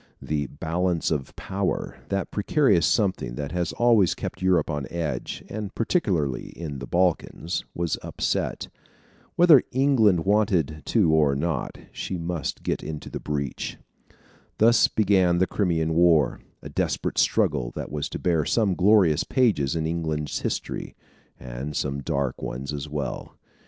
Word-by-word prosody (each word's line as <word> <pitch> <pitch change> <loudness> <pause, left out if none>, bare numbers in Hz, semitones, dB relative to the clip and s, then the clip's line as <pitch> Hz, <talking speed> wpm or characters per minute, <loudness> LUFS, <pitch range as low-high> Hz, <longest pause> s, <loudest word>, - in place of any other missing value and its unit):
The 75 -2 -2
"balance 85 +4 -1
of 75 -4 -3
power," 95 -1 -3
that 100 0 -2
precarious 105 - +2
something 95 - 0
that 70 +1 -4
has 90 +1 -1
always 115 -6 +3
kept - - -6
Europe 90 -4 +3
on 75 -4 -3
edge 85 -3 -4
and 105 -2 -6
particularly 90 - 0
in 75 -5 -5
the 65 - -7
Balkans 90 -1 0
was 85 -2 -1
upset. - - -2 0.7
Whether 170 -7 +7
England 115 -10 +3
wanted 95 -8 +1
to 95 -9 +3
or 75 -3 +3
not, 75 -2 -2
she 95 - -4
must 85 -2 -4
get - - -1
into 75 -1 -7
the - - -4
breach. 70 -3 -4 0.8
Thus 115 +2 +5
began 95 -4 +3
the 95 - +3
Crimean 85 -5 0
War, 80 -5 +3 0.2
a - - -7
desperate - - -1
struggle - - +2
that - - -5
was 75 -1 -3
to - - -5
bear 85 -3 +1
some 105 0 +1
glorious 95 -4 +4
pages 95 - +1
in 80 -1 -1
England's 80 -2 -2
history, - - -4 0.4
and 65 +4 -6
some 70 +1 -2
dark 70 -1 -2
ones 70 +4 -4
as 75 +1 -5
well. 70 -4 -5
85 Hz, 145 wpm, -25 LUFS, 75-100 Hz, 0.8 s, Whether